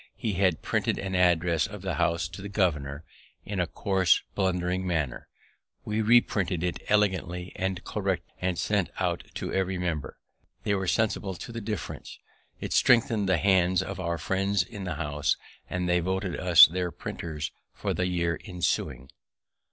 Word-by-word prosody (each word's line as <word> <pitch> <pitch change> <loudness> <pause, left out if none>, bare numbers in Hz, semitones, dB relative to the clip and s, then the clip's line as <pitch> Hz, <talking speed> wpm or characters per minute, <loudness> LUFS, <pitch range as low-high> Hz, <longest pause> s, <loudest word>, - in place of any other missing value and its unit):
He 110 - -2
had 90 -4 +1
printed - - 0
an 95 -1 -4
address 85 -3 +3
of 105 -2 -9
the 95 -2 -1
House 85 -1 +1
to 85 +2 -9
the 100 - -6
governor, 75 -7 0 0.4
in 100 -2 -3
a 90 - +1
coarse, 95 -2 +2
blundering 90 -1 0
manner; 75 -8 -2 0.6
we 105 +1 0
reprinted 100 -6 +3
it 90 -1 -2
elegantly 95 -4 +1
and 95 -1 -2
correctly, - - -2
and 90 -1 0
sent 100 -1 +1
one - - 0 0.2
to - - -4
every 95 -1 0
member. 80 -6 -3 0.5
They 100 - +1
were 95 -1 -1
sensible 105 +2 +1
of 95 - -4
the 115 -1 -6
difference: 105 -4 -5 0.4
it - - -4
strengthened 115 -4 +4
the 95 - +4
hands 90 0 +3
of - - -6
our 85 -2 -1
friends 95 +1 +1
in 100 +1 -8
the 90 -3 -3
House, 75 -2 0 0.3
and 90 -1 -1
they 90 0 +3
voted 95 +1 -1
us 85 -3 +9
their 90 +1 -2
printers 80 -2 -5 0.2
for - - -3
the 90 - 0
year 85 -3 0
ensuing. 65 -8 -2
90 Hz, 165 wpm, -27 LUFS, 85-95 Hz, 0.6 s, us